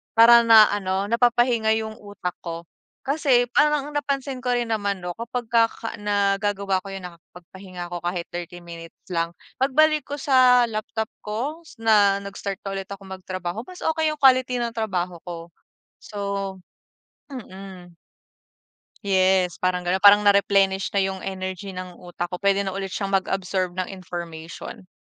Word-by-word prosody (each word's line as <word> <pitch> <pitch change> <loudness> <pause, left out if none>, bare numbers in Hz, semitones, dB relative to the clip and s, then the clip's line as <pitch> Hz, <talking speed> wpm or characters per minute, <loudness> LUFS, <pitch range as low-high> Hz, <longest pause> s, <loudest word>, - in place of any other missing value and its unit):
para 235 +1 +8
na 225 -2 +8
ano 195 -1 -1
napapahinga 235 -1 +2
yung 220 0 -6
utak 205 -4 -6
ko. 170 -1 -6 0.4
Kasi 270 -3 +3
parang 295 -1 +2
napansin 275 -2 -2
ko 250 - -3
rin 240 0 0
naman 205 -2 -1
'no 175 0 -4
kapag 235 +4 -5
ka 230 -1 +5
ka 225 - -7
nagagawa 200 -1 0
ko 195 - -12
'yon, 195 -1 -7
nakapagpahinga 180 +1 -11
ako 175 - -4
kahit 175 0 -3
30 175 0 -7
minutes 165 -1 -10 0.2
lang, 170 0 -1 0.2
pagbalik 305 +3 +3
ko 285 - -4
sa 255 -3 +5
laptop 220 +1 -4
ko 255 +10 -4 0.2
na 205 -3 +5
nag-start 200 0 -5
na 195 - -4
ulit 190 - -7
ako 200 0 -8
magtrabaho, 185 0 -5
mas 365 -1 -10
okey 320 0 +1
yung 305 - -4
quality 255 -1 +5
ng 235 -1 -2
trabaho 185 -6 -2
ko 170 -1 -7 0.5
so, 210 - -9 1.1
mm. 190 -7 -10 1.1
Yes, 190 -2 +2
parang 180 0 0
ganon. 180 +2 0
Parang 205 +1 +7
na-replenish 195 -1 +3
na 200 - +3
yung 190 0 -2
energy 190 0 -5
ng 180 -1 -8
utak 175 0 -6
ko, 180 - -4
pwede 200 +1 +2
na 195 - -3
ulit 195 -1 -4
siyang 195 -2 -3
mag-absorb 190 -1 -1
ng 185 0 -3
information, 170 -2 -8
200 Hz, 155 wpm, -23 LUFS, 185-230 Hz, 1.1 s, para